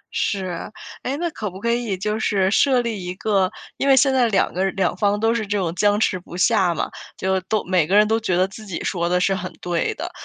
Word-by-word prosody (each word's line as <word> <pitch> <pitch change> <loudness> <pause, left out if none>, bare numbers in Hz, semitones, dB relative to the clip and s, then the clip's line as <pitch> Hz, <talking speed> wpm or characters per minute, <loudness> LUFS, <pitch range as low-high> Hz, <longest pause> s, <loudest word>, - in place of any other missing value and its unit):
是， 185 -1 -2 0.3
哎， 270 +3 -3
那 345 +2 -1
可 210 -7 -4
不 185 +2 -10
可 235 +2 0
以 235 -5 -1
就 210 +3 -2
是 195 -3 +1
设 255 +2 +4
立 220 -6 -4
一 180 - -4
个 195 -2 +1 0.3
因 275 - -1
为 270 - +6
现 265 +1 +4
在 250 -3 +3
两 210 - +1
个 185 - 0
人 195 - 0
两 195 -2 +1
方 205 +2 +1
都 225 +1 +2
是 230 -2 -1
这 205 +1 0
种 175 -4 -1
僵 205 +2 +2
持 185 -4 +1
不 175 0 -10
下 185 -2 +3
嘛， - - -1 0.3
就 190 0 0
都 215 +3 -1
每 180 -4 +2
个 195 - +3
人 210 0 +6
都 225 +1 +2
觉 185 -6 0
得 185 - +3
自 195 +3 -11
己 185 - -5
说 170 -2 -1
的 180 - +2
是 195 +2 +2
很 185 -1 -5
对 175 -2 -1
的。 - - -5
200 Hz, 275 characters per minute, -22 LUFS, 185-220 Hz, 0.3 s, 为